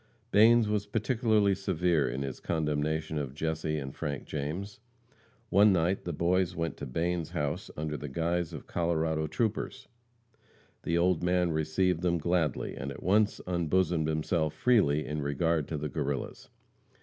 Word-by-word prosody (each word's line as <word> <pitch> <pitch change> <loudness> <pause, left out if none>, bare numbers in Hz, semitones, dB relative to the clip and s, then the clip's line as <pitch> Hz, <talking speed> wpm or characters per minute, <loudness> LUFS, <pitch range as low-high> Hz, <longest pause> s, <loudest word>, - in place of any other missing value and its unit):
Banes 115 +2 +6
was 105 -1 -1
particularly 110 -2 +2
severe 90 -5 +1
in 65 +3 -3
his 65 -2 -5
condemnation 80 0 -1
of 70 -2 -5
Jesse 80 0 -2
and 70 -2 -5
Frank 70 -2 -4
James. 85 +9 -4 0.7
One 100 +2 +6
night 90 +1 +1
the 85 - -2
boys 85 +2 +1
went 80 -3 -2
to - - -6
Bane's 85 +4 -1
house 75 0 -3
under 75 0 -3
the 75 - -6
guise 85 +3 -1
of - - -8
Colorado 80 -2 0
troopers. 110 +5 -2 0.9
The 85 - 0
old 90 -1 +2
man 90 -1 +2
received 80 +3 +1
them 85 -1 +1
gladly, 85 -2 0
and 70 - -5
at - - -9
once 105 +3 +2
unbosomed 85 -2 +1
himself 80 0 0
freely 75 -12 +3
in 75 0 -3
regard 75 +2 0
to 80 - -3
the 75 +1 -3
Guerrillas. 70 -3 -4
85 Hz, 150 wpm, -30 LUFS, 75-90 Hz, 0.9 s, Banes